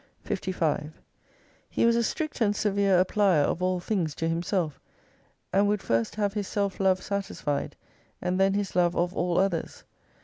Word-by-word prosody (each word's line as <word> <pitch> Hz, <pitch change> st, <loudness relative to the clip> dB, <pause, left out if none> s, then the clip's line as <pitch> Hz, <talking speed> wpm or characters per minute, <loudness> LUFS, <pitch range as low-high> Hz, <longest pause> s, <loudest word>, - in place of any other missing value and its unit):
55 160 Hz, -4 st, -2 dB, 0.8 s
He -, -, +1 dB
was 230 Hz, 0 st, +4 dB
a 235 Hz, -, +3 dB
strict 300 Hz, +4 st, -3 dB
and 205 Hz, -2 st, +3 dB
severe 200 Hz, -3 st, +3 dB
applier 190 Hz, -7 st, +3 dB
of 165 Hz, -, -1 dB
all 185 Hz, 0 st, +1 dB
things 175 Hz, -5 st, -1 dB
to 165 Hz, -, -2 dB
himself, 165 Hz, -2 st, -1 dB, 0.7 s
and 200 Hz, +2 st, +4 dB
would 205 Hz, -1 st, 0 dB
first 115 Hz, -1 st, 0 dB
have 205 Hz, -2 st, 0 dB
his 205 Hz, -2 st, -3 dB
self 200 Hz, -2 st, -2 dB
love 190 Hz, -1 st, +2 dB
satisfied, 195 Hz, -7 st, -3 dB, 0.4 s
and 180 Hz, +1 st, -1 dB
then 195 Hz, 0 st, +3 dB
his 200 Hz, -3 st, -2 dB
love 175 Hz, -1 st, +3 dB
of 175 Hz, +1 st, 0 dB
all 175 Hz, 0 st, 0 dB
others. 185 Hz, -3 st, -1 dB
185 Hz, 165 wpm, -27 LUFS, 175-200 Hz, 0.8 s, was